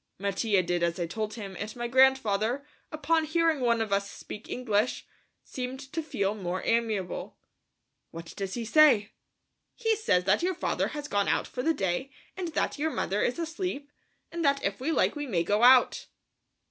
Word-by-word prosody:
Mattia 200 0 +1
did 175 0 -1
as 170 +1 0
I 175 - 0
told 215 +5 -4
him, 200 -4 -7
and 215 0 -5
my 240 0 -3
grandfather, 260 -1 +3 0.3
upon 315 +1 +1
hearing 325 -1 +1
one 235 -2 +2
of 215 -3 -1
us 200 0 0
speak 210 - -10
English, 225 -2 -1 0.4
seemed 255 0 -5
to 325 - -1
feel 200 -10 -1
more 185 -3 -4
amiable. 220 -6 -1 0.7
"What 165 0 -9
does 195 -1 -4
he 235 -1 -4
say?" 230 -5 +5 0.6
"He 450 -2 +1
says 185 - +1
that 195 +3 +2
your 365 +1 0
father 360 - -1
has 295 -1 -6
gone 205 -6 0
out - - +1
for 250 - -5
the 320 +4 +1
day 190 +8 -1 0.3
and 365 -1 -4
that - - -1
your 315 +2 +1
mother 205 -8 -1
is 245 - 0
asleep, 325 -3 -4 0.4
and 335 0 -3
that 280 -1 +2
if 195 0 -2
we 300 +5 0
like - - +2
we 290 -1 -4
may 175 -8 0
go 205 +5 +1
out." 250 +1 +5
235 Hz, 185 wpm, -28 LUFS, 200-290 Hz, 0.7 s, say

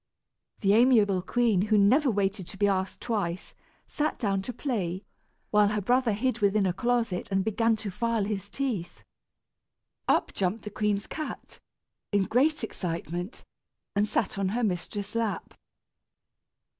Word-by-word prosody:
The 200 -1 +4
amiable 215 -5 +5
queen, 225 -1 +2
who 215 - +5
never 255 +9 +5
waited 195 -3 -1
to 195 - -9
be 205 +1 +3
asked 190 -1 -1
twice, 195 -7 -2 0.3
sat 305 +1 -2
down 195 -5 0
to 220 - -5
play, 200 - -3 0.5
while 210 -1 +5
her 210 +1 0
brother 245 +2 +2
hid 250 +5 0
within 200 0 +3
a 180 - +1
closet 230 -1 0
and 195 0 +1
began 225 +1 +2
to 215 -2 -5
file 230 +2 0
his 200 -1 -3
teeth. 235 -11 -3 1.0
Up - - +2
jumped 195 +3 -1
the 210 - -6
queen's 205 -1 0
cat, 310 -1 -7 0.5
in 200 -2 +3
great 270 +8 +2
excitement, 175 - -4 0.5
and 205 +1 +2
sat 200 -2 -1
on 195 -1 +1
her 245 - 0
mistress' 200 +1 -2
lap. 230 -2 -2
205 Hz, 145 wpm, -28 LUFS, 195-230 Hz, 1.0 s, amiable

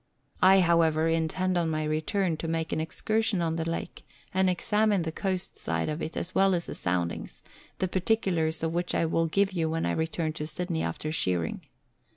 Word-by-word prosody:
I, 190 +1 +7
however, 165 -2 +3
intend 165 +3 +1
on 165 -1 0
my 155 -1 -1
return 160 +4 0
to 165 - -4
make 160 0 -1
an - - 0
excursion 215 +5 0
on 165 -1 0
the 165 0 -2
lake, 165 - -5 0.3
and 190 0 +3
examine 210 +1 +2
the 160 - -3
coast 185 +1 -3
side - - -1
of 155 +2 -3
it 160 - -4
as 185 - -3
well 195 -1 +4
as 170 - -2
the - - -6
soundings, 90 -1 -3 0.3
the 185 - 0
particulars 180 -5 0
of 165 0 0
which 175 +1 -1
I - - +2
will 165 +1 +1
give 195 +4 +2
you 165 -3 0
when 165 +1 -1
I - - +1
return 160 0 -1
to 150 -1 -4
Sydney 170 0 -2
after 155 - -3
shearing. 90 - 0
165 Hz, 195 wpm, -28 LUFS, 160-185 Hz, 0.3 s, I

